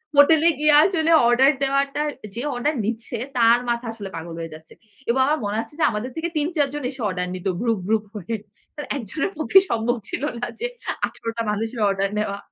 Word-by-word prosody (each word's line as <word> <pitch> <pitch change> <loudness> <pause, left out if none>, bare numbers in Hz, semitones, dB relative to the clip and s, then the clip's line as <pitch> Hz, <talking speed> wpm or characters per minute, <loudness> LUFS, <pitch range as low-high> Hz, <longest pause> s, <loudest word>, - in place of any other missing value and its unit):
হোটেলে 315 +3 +6
গিয়ে 300 0 +4
আসলে 330 -3 +2 0.2
অর্ডার 260 +4 +5
দেওয়াটা, 275 +2 +1 0.3
যে 235 - -3
অর্ডার 290 +6 0
নিচ্ছে 230 +1 -3 0.2
তার 235 +1 +6
মাথা 235 0 -1
আসলে 205 -4 -7
পাগল 165 0 -6
হয়ে 165 -1 -6
যাচ্ছে। 160 +1 -13 0.4
এবং 255 - +2
আমার 305 +2 +1
মনে 205 +2 -1
আছে 295 - -17
যে, - - +2
আমাদের 220 +4 -4
থেকে 330 +1 -2
৩-৪ 300 -1 +1
জন 295 - -4
এসে 265 -2 -9
অর্ডার 180 -1 -2
নিত 185 +1 -5
গ্রুপ, 230 -4 +1
গ্রুপ 220 -1 +1
হয়ে। 210 +3 -3 0.4
অ্যা 295 - -5
একজনের 280 - -3
পক্ষে 350 +5 +6
সম্ভব 235 +2 +1
ছিল - - -4 0.2
না 245 - -1
যে 485 - -2 0.4
১৮ 230 - -7
টা 230 - 0
মানুষের 225 +3 -3
অর্ডার 195 0 0
নেওয়া, 200 -1 -2
240 Hz, 195 wpm, -23 LUFS, 210-295 Hz, 0.4 s, হোটেলে